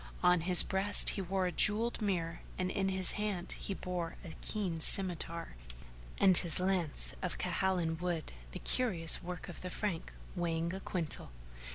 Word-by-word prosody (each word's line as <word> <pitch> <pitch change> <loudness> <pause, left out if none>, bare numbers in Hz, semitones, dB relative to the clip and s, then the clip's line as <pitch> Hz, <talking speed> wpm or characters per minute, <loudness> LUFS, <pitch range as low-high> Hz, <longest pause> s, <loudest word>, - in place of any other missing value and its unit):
On 180 -1 +4
his 180 +1 +5
breast 195 +2 +2
he 195 - -2
wore 190 0 -2
a 180 - -1
jewelled 220 +6 +1
mirror 175 -5 -2 0.2
and 185 0 -2
in 195 0 -1
his 190 -1 +4
hand 210 -4 -3
he 195 - -4
bore 175 -3 -5
a 160 - -9
keen 190 -6 -2
scymitar 170 -1 +1 0.7
and 190 -2 +4
his 170 -1 +8
lance 180 -4 -1
of 180 - -4
Khalanj 180 -3 -1
wood,[FN#446] 175 - -4 0.2
the - - -6
curious 185 -11 +3
work 180 0 -7
of - - -10
the 180 - -6
Frank, 180 -3 -4 0.2
weighing 170 -1 -2
a 190 - -5
quintal. 170 -5 -3
180 Hz, 165 wpm, -32 LUFS, 170-195 Hz, 0.7 s, his